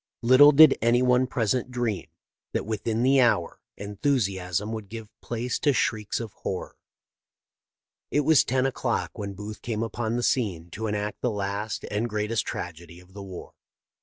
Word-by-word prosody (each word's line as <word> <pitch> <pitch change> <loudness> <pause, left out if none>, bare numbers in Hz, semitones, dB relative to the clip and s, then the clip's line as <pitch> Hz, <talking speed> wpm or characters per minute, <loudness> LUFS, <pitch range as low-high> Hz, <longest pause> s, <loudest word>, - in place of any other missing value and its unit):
Little 130 +5 +8
did 150 0 +7
anyone 125 +2 +3
present 125 +1 -1
dream 120 -8 -2 0.5
that - - -1
within 110 +2 -2
the 135 +1 +5
hour 100 -9 +1 0.2
enthusiasm 100 - -1
would 110 -3 -6
give 110 -1 -8
place 120 +1 -3
to 145 - +2
shrieks 110 -5 -1
of 115 -4 -7
horror. 95 - -5 1.3
It 145 - +2
was 155 0 +5
ten 130 +1 0
o'clock 125 -3 -2
when 100 -1 -5
Booth 105 +2 -8
came 115 -2 -2
upon 115 0 -3
the 120 - -1
scene 90 -11 -1
to 110 +5 -4
enact 105 0 -3
the 125 - +1
last 100 0 -3
and 110 +3 -1
greatest 105 +1 -1
tragedy 85 0 -7
of 90 +1 -19
the 100 - -8
war. 95 -2 -9
110 Hz, 160 wpm, -26 LUFS, 100-125 Hz, 1.3 s, Little